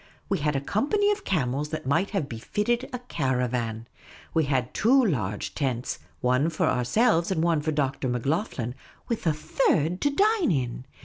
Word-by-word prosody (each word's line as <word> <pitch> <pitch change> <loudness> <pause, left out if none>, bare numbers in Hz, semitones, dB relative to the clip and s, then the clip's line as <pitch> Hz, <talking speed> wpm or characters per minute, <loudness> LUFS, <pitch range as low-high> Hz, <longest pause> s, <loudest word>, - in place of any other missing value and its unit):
We - - +1
had 150 0 0
a 135 - 0
company 355 - +1
of 410 -1 -2
camels 145 -4 0
that 155 -3 -5
might 165 +9 +1
have 190 -9 -1
befitted 210 - -1
a 250 - -3
caravan. 125 - -2 0.5
We 160 -2 +3
had 130 -3 0
two 255 +4 +4
large 110 - -1
tents, 130 -4 -2 0.2
one 125 +5 +2
for 165 - 0
ourselves, 165 - +2
and 170 -4 0
one 165 -3 +2
for 155 +1 -1
Dr. 140 -3 -1
Macloghlen, 125 - -1 0.3
with 230 -7 -2
a 160 - +4
third 155 - +1
to 285 - +3
dine 405 - +3
in. 125 -4 -2
150 Hz, 170 wpm, -26 LUFS, 125-210 Hz, 0.5 s, two